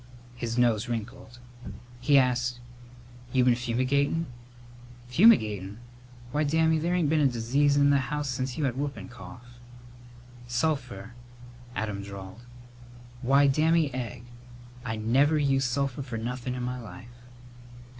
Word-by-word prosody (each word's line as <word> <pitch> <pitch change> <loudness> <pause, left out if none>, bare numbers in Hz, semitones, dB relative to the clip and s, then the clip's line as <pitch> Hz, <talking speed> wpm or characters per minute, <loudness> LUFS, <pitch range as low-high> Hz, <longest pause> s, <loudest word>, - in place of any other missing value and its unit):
His 120 -1 -4
nose 120 -2 +2
wrinkled. 120 +2 -6 0.6
He 140 +3 +4
asked, 125 -2 +1 0.7
"You 130 -2 +3
been 125 - +5
fumigatin'?" 130 +6 0 0.8
"Fumigatin'! 110 - +4 0.5
Why, 150 +3 +1
Dammy, 160 +2 +2
there 170 +3 0
ain't 175 -4 +2
been 160 - +3
a 140 - +5
disease 135 +4 +1
in 145 0 +5
the 140 - +4
house 150 +2 -3
since 130 -1 -3
you 155 - -1
had 130 -3 0
whoopin' 140 -1 -4
cough." 120 0 -13 0.9
"Sulphur," 120 -6 -2 0.6
Adam 105 -2 -3
drawled. 100 +1 -9 0.8
"Why, 140 +3 +4
Dammy 155 +1 +2
Egg! 125 -2 -5 0.6
I 110 -3 -3
never 130 +8 +2
used 135 -3 +1
sulphur 140 +1 -1
for 125 -4 -5
nothin' 125 +2 -4
in 125 - -4
my 125 0 -4
life!" 115 +4 -12
125 Hz, 130 wpm, -27 LUFS, 120-140 Hz, 0.9 s, been